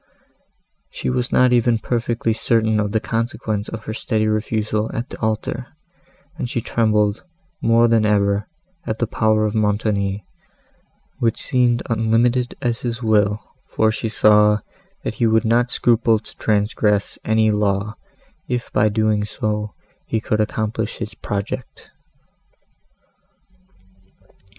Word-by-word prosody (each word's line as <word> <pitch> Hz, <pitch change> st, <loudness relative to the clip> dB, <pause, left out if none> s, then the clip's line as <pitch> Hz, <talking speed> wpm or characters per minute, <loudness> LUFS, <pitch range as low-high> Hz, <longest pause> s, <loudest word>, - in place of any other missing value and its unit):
She -, -, -3 dB
was 125 Hz, -1 st, -1 dB
not 125 Hz, -1 st, +4 dB
even 120 Hz, -1 st, +3 dB
perfectly 115 Hz, 0 st, -1 dB
certain 110 Hz, -1 st, +1 dB
of 105 Hz, -1 st, -1 dB
the 110 Hz, -, +1 dB
consequence 115 Hz, -2 st, -2 dB
of 110 Hz, -1 st, -7 dB
her 110 Hz, -, -4 dB
steady 110 Hz, -1 st, -1 dB
refusal 110 Hz, 0 st, -1 dB
at 120 Hz, +3 st, -3 dB
the -, -, -9 dB
altar, 110 Hz, -1 st, -2 dB, 0.7 s
and 120 Hz, -, -2 dB
she 125 Hz, -2 st, -1 dB
trembled, 105 Hz, -2 st, +1 dB, 0.4 s
more 115 Hz, +1 st, +4 dB
than 115 Hz, -1 st, +3 dB
ever, 100 Hz, -1 st, +1 dB, 0.4 s
at 110 Hz, -, -2 dB
the 120 Hz, -, 0 dB
power 110 Hz, -1 st, +1 dB
of 105 Hz, -, -1 dB
Montoni, 105 Hz, -2 st, 0 dB, 0.9 s
which 115 Hz, -2 st, +1 dB
seemed 120 Hz, -2 st, +1 dB
unlimited 120 Hz, +2 st, +1 dB
as 120 Hz, -1 st, -1 dB
his 120 Hz, 0 st, -3 dB
will, 105 Hz, -1 st, +2 dB, 0.2 s
for 110 Hz, 0 st, +2 dB
she 110 Hz, +1 st, -3 dB
saw, 105 Hz, -1 st, +4 dB, 0.4 s
that -, -, -2 dB
he 115 Hz, -, +5 dB
would 110 Hz, +1 st, +2 dB
not 120 Hz, +2 st, +2 dB
scruple 115 Hz, -2 st, +3 dB
to 105 Hz, -, -12 dB
transgress 105 Hz, -1 st, +1 dB
any 110 Hz, 0 st, +3 dB
law, 105 Hz, 0 st, 0 dB, 0.5 s
if, 125 Hz, -1 st, -3 dB
by 110 Hz, -, +3 dB
so -, -, +4 dB
doing, 110 Hz, -1 st, +1 dB, 0.8 s
he 110 Hz, -, 0 dB
could 110 Hz, 0 st, 0 dB
accomplish 110 Hz, 0 st, -2 dB
his 110 Hz, -1 st, -5 dB
project. 105 Hz, +4 st, -5 dB
110 Hz, 130 wpm, -20 LUFS, 105-115 Hz, 0.9 s, he